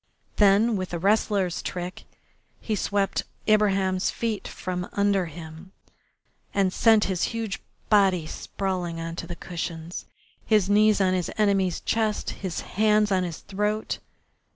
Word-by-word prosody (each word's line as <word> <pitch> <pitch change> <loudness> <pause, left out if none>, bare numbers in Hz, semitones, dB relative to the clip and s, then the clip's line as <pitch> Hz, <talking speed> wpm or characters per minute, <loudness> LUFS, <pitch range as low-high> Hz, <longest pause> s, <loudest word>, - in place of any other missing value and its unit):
Then, 210 +3 +5
with 185 -2 -3
a - - -1
wrestler's 195 -1 +1
trick, 180 0 -5 0.5
he 220 - -2
swept 200 0 0 0.3
Ibraheim's 195 -3 +3
feet 225 -3 -3
from 180 -1 -4
under 200 -3 +2
him 160 +3 -10 0.8
and 195 -2 +2
sent 220 -2 +5
his 185 -3 -1 0.2
huge 220 -4 -3 0.3
body 190 -5 +4
sprawling 180 -1 -3
on 165 0 -4
to 170 - -5
the 175 - -5
cushions, 170 -1 -5 0.4
his 210 -4 +3
knee 210 +2 +5
on 185 -1 +3
his 180 -2 -1
enemy's 195 -4 +2
chest, 220 -2 0
his 185 -4 -3
hands 210 0 +2
on 190 -1 +3
his 170 -3 -5
throat. 210 +2 -2
195 Hz, 135 wpm, -26 LUFS, 180-210 Hz, 0.8 s, Then